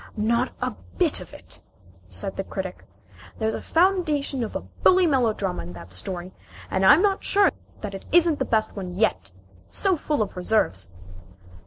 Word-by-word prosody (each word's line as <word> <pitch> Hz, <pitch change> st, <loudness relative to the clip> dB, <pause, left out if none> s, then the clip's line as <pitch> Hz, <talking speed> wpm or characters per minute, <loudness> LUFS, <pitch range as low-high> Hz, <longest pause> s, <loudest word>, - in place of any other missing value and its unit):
"Not 235 Hz, +4 st, +1 dB
a -, -, 0 dB, 0.3 s
bit -, -, +4 dB
of -, -, -10 dB
it," -, -, -11 dB, 0.5 s
said 100 Hz, -, -1 dB
the 195 Hz, -, -3 dB
Critic. 190 Hz, -1 st, -6 dB, 0.5 s
"There's 220 Hz, 0 st, 0 dB
the -, -, -4 dB
foundation 320 Hz, -7 st, +1 dB
of 220 Hz, -, -6 dB
a -, -, -2 dB
bully 370 Hz, 0 st, +3 dB
melodrama 235 Hz, -, +1 dB
in 85 Hz, +1 st, -8 dB
that 85 Hz, +1 st, -10 dB
story, 175 Hz, -, -4 dB, 0.4 s
and 190 Hz, -, +1 dB
I'm 300 Hz, -, +7 dB
not 395 Hz, -2 st, +1 dB
sure 400 Hz, 0 st, +4 dB, 0.3 s
that 210 Hz, -2 st, -5 dB
it 195 Hz, -, -8 dB
isn't 335 Hz, -2 st, +4 dB
the -, -, 0 dB
best 220 Hz, -1 st, 0 dB
one 180 Hz, -3 st, -6 dB
yet 140 Hz, -, 0 dB, 0.4 s
so 380 Hz, -, +1 dB
full 295 Hz, -6 st, 0 dB
of 205 Hz, -, -8 dB
reserves." 135 Hz, -, +1 dB
215 Hz, 170 wpm, -24 LUFS, 180-300 Hz, 0.5 s, I'm